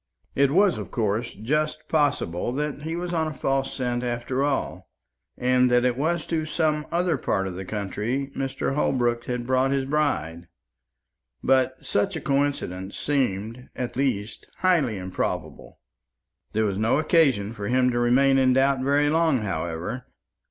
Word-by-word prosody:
It 140 0 +3
was, 190 +5 +3
of - - -6
course, 115 +1 -1
just 150 +8 -1
possible 145 - 0
that 150 +1 -3
he 160 +2 -3
was 175 0 -4
on 160 -2 +1
a 155 - -4
false 135 0 0
scent 125 -2 -1
after 120 +2 -1
all, 145 -1 -2 0.5
and 125 0 +3
that 125 0 +3
it 125 -1 +2
was 160 +4 -1
to 160 -2 -1
some 155 -1 0
other 170 -4 +1
part 95 - 0
of 95 - -4
the 95 +1 -6
country 110 +7 -3
Mr. 135 0 -2
Holbrook 120 -4 +1
had 125 -1 -3
brought 130 +1 +2
his 135 -1 0
bride; 90 - -1 1.0
but 130 0 +2
such 195 -2 0
a - - -2
coincidence 135 -10 -1
seemed, 125 -3 -1
at 125 -2 -4
the - - -5
least, 110 -6 -2
highly 155 - +2
improbable. 95 0 -4 0.8
There 110 +1 +2
was 100 -1 -1
no 110 +4 +2
occasion 140 - +2
for 100 -3 -5
him 125 +1 +3
to 120 - 0
remain 135 +3 +4
in 130 -1 +4
doubt 135 +1 +3
very 140 +2 +2
long, 160 -6 +2
however. 90 +7 -4
130 Hz, 160 wpm, -25 LUFS, 115-145 Hz, 1.0 s, remain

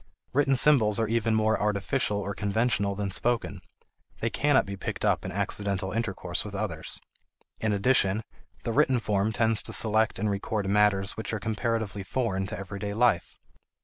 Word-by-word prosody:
Written 135 0 +3
symbols 120 -6 +4
are 115 - +1
even 115 0 +1
more 110 0 +2
artificial 105 +2 0
or 100 0 -3
conventional 100 -1 0
than 100 -1 -3
spoken; 100 -1 -1 0.6
they - - -1
cannot 145 -1 +3
be 100 - -5
picked 95 - -4
up - - +2
in 95 - -5
accidental 100 0 -1
intercourse 95 -6 -2
with 105 -1 -7
others. 95 -6 -3 0.6
In 110 - 0
addition, 105 -1 +2 0.4
the 115 - -2
written 135 -2 +3
form 105 -1 0
tends 110 0 +2
to - - -6
select 110 0 +3
and 110 - -1
record 100 0 -2
matters 100 -1 +3
which 110 - -5
are 110 - -1
comparatively 110 -1 -2
foreign 95 -2 -2
to 105 - -5
everyday 100 +1 -5
life. 110 -7 +1
105 Hz, 165 wpm, -27 LUFS, 100-115 Hz, 0.6 s, symbols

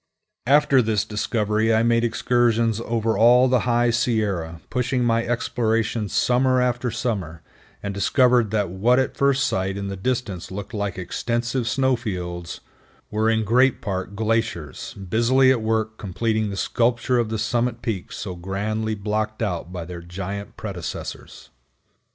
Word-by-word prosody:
After 140 -1 +5
this 110 -3 0
discovery, 105 0 0
I 110 0 +3
made 115 0 +3
excursions 115 -1 +1
over 115 -1 0
all 120 +4 +6
the 125 -1 +1
High 120 0 +3
Sierra, 105 -9 -1
pushing 125 0 0
my 115 -1 +2
explorations 115 -2 -1
summer 130 +1 +3
after 125 0 0
summer, 105 -9 -3 0.4
and 100 -1 -3
discovered 120 +3 +3
that 105 -4 0
what 115 +7 +3
at 130 - 0
first 140 -1 +2
sight 95 -2 -1
in 100 -1 -4
the 100 - -4
distance 100 -4 -3
looked 100 +3 -7
like 100 -3 -3
extensive 120 +6 -2
snow 130 +1 +2
fields, 90 -7 -5 0.5
wore 110 +1 +1
in 110 -1 +2
great 125 +4 +3
part 95 0 -4
glaciers, 110 - -2
busily 120 +7 +3
at 125 -3 +1
work 110 0 -1
completing 110 +2 -1
the 100 - -5
sculpture 120 +2 +1
of 115 -2 0
the 110 - -2
summit 120 +1 -1
peaks 110 -7 -4
so 95 -3 -5
grandly 105 +5 -2
blocked 110 +2 -2
out 90 -4 -3
by 90 -2 -5
their 85 0 -8
giant 95 +4 -6
predecessors. 95 -6 -7
110 Hz, 150 wpm, -23 LUFS, 100-120 Hz, 0.5 s, all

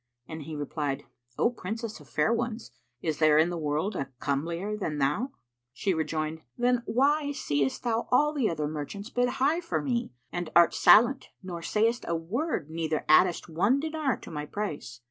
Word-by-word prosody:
and 160 0 -7
he 160 - -6
replied, 145 -1 -3 0.3
"O 235 - +3
Princess 225 +1 -5
of - - -16
fair 230 - +2
ones, 235 -1 -3 0.3
is 155 -2 -1
there 155 -1 +5
in 160 +3 +4
the - - -3
world 155 +7 -1
a 135 -4 -3
comelier 165 +8 -2
than 160 -8 -3
thou?" 150 - +1 0.4
She 190 +9 0
rejoined, 160 -1 -2 0.2
"Then 245 0 +2
why 285 +4 +2
seest 145 - -1
thou 230 -1 0
all 295 +4 +4
the 270 -7 +1
other 155 -3 -2
merchants 155 - -6
bid 245 -1 +2
high 275 +6 +1
for 340 - -1
me 245 -3 -1 0.2
and 175 -2 -3
art 170 -1 +6
silent 235 +9 +5
nor 175 -2 -6
sayest 225 +6 +1
a 170 - 0
word 180 - -2
neither 160 -1 -2
addest 170 +3 +4
one 200 - +2
dinar 310 -5 -1
to - - -10
my 150 -1 -4
price? 145 - -5
185 Hz, 180 wpm, -28 LUFS, 155-245 Hz, 0.4 s, art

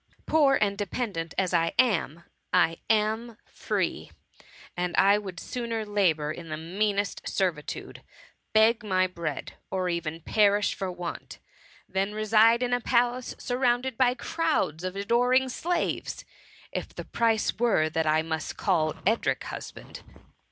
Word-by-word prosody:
Poor 285 -4 +4
and 200 -1 0
de 205 - -1
pendant 185 -9 -3
as 185 -2 0
I 165 -1 +2
am, 170 - +2 0.3
I 165 -2 +3
am 220 +1 +1
free; - - -3 0.7
and 180 0 -2
I 200 +2 +5
would 190 -4 -7
sooner 230 -2 -3
labour 175 -8 +1
in 165 +1 -8
the 155 - -3
meanest 200 +5 -1
servitude, 175 -6 -3 0.5
beg 220 +1 +4
my 185 -3 +2
bread, 170 -5 -4 0.2
or 185 -1 -1
even 165 -2 -3
perish 205 +3 +3
for 190 -1 -4
want, 175 -1 -7 0.5
than 195 +2 -1
reside 220 +2 +4
in 245 0 0
a 245 - +1
palace 245 +1 +1
surrounded 245 0 0
by 250 0 +3
crowds 315 - -1
of 185 0 -3
adoring 245 +5 +2
slaves, 350 +7 -2 0.5
if - - -5
the - - -6
price 225 -2 +1
were 225 -10 +3
that 160 0 -1
I 155 +1 +3
must 160 -1 -4
call 160 -6 +1
Edric 225 +4 +1
husband.' - - -8
205 Hz, 140 wpm, -27 LUFS, 170-235 Hz, 0.7 s, I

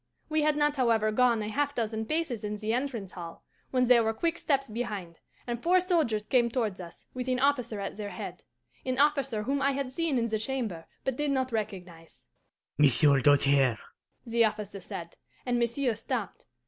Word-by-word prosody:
We 310 0 +2
had 300 0 +2
not, 295 -1 +2
however, 225 -4 +2
gone 235 -1 +3
a - - -4
half 285 +5 -1
dozen 220 -1 -2
paces 305 -8 -1
in 210 0 -3
the 215 +1 -2
entrance 245 -6 -2
hall 170 -2 -9 0.3
when 255 -1 +2
there 240 -1 +6
were 220 0 0
quick 335 +6 -1
steps 275 -2 +1
behind, 210 -7 -5 0.3
and 240 -1 -4
four 360 +2 +4
soldiers 320 - +1
came 240 +1 +2
towards 220 -6 -2
us, 170 -1 -12
with 255 0 -4
an 255 -1 +1
officer 250 -6 +1
at 200 - -5
their 210 -1 -4
head - - -7 0.4
an 255 -1 -2
officer 275 -6 +2
whom 275 +4 -1
I 275 +1 +2
had 270 -1 -3
seen 320 -1 0
in 235 - +1
the 220 -2 -1
chamber, 220 -9 -3 0.2
but 265 -2 -2
did 295 0 0
not 260 -2 0
recognize. 180 -7 -6 0.5
"'Monsieur 140 0 +5
Doltaire,' 140 -3 +4 0.5
the 235 0 +3
officer 210 -2 -2
said; 170 0 -8 0.3
and 245 -1 +1
monsieur 240 +1 +1
stopped. 225 -2 -5
235 Hz, 185 wpm, -29 LUFS, 210-270 Hz, 0.5 s, there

